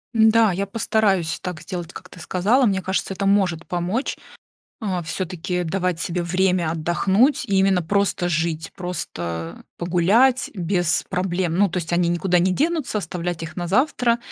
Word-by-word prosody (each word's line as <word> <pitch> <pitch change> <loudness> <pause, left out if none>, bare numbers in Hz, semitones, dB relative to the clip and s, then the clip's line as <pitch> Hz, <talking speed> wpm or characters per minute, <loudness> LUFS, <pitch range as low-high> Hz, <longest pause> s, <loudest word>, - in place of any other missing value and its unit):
Н-да, 220 -1 +5
я 195 +3 -1
постараюсь 200 -5 0
так 180 -4 -5
сделать, 175 -1 -6
как 180 - -11
ты 180 - -13
сказала. 205 +11 +2
Мне 195 -4 +1
кажется, 190 +1 -2
это 195 +1 -3
может 190 -4 +1
помочь, 180 +9 -2 0.6
а, 185 -5 -2
всё-таки 180 +1 -3
давать 180 0 -1
себе 175 +1 -1
время 180 -1 +1
отдохнуть 190 - +2
и 195 -2 0
именно 190 -2 +3
просто 200 0 0
жить, 160 -1 -1
просто 85 - -5
погулять 195 +10 +3
без 175 -2 0
проблем. 180 -2 -1
Ну, 200 0 +4
то 180 - -3
есть 170 -1 -5
они 175 0 +2
никуда 175 +1 +1
не 185 +2 +2
денутся, 300 - 0
оставлять 175 -3 -4
их 165 +1 -7
на 175 - -3
завтра. 235 - +2
180 Hz, 160 wpm, -22 LUFS, 170-200 Hz, 0.6 s, Н-да